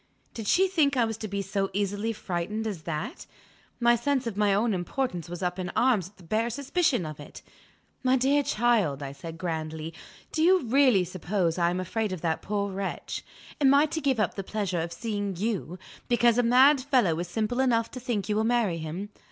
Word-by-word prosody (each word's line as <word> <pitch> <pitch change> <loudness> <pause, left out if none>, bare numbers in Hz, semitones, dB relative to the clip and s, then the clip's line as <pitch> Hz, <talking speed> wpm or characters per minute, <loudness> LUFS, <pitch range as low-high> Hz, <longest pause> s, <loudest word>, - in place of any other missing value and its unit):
Did 225 -3 -6
she 380 - +4
think 300 -7 +2
I 240 - +4
was 225 0 -3
to 220 - -5
be 200 0 -3
so 195 0 -1
easily 205 +3 -1
frightened 205 +1 -3
as 200 -7 -4
that? 155 -2 -4 0.5
My 240 0 +5
sense 265 +2 0
of 230 -4 -3
my 205 -1 +2
own 210 +3 +2
importance 180 -1 -3
was 175 +1 -6
up 180 +1 -2
in 180 -1 -3
arms 220 -9 +2
at 205 - -30
the 185 - -16
bare 220 +7 0
suspicion 280 - 0
of 155 -1 -7
it! 145 - -11 0.6
"My 255 0 +3
dear 275 +3 +3
child," 215 - +1
I 135 - -5
said 160 +4 -9
grandly, 160 -2 -4 0.4
"do 315 - -1
you 360 +1 +5
really 250 -5 +4
suppose 180 0 -1
I 170 0 +3
am 180 +1 -2
afraid 210 +3 -2
of 185 -4 -5
that 160 -2 -1
poor 200 -1 -2
wretch? 195 0 -4 0.4
Am 275 -1 +6
I 285 +2 +6
to 315 +1 -3
give 270 -5 +1
up 215 - +1
the 195 - -5
pleasure 190 -4 -2
of 170 +1 -4
seeing 205 0 -3
you, 190 -3 -2 0.3
because 240 -1 +3
a - - +6
mad 260 +4 +5
fellow 245 - +2
is 175 - -3
simple 220 +6 -2
enough 235 -4 +2
to 255 - -7
think 235 -5 -2
you 210 - 0
will 220 - +2
marry 225 -7 +1
him? 165 +6 -5
210 Hz, 210 wpm, -27 LUFS, 180-245 Hz, 0.6 s, Am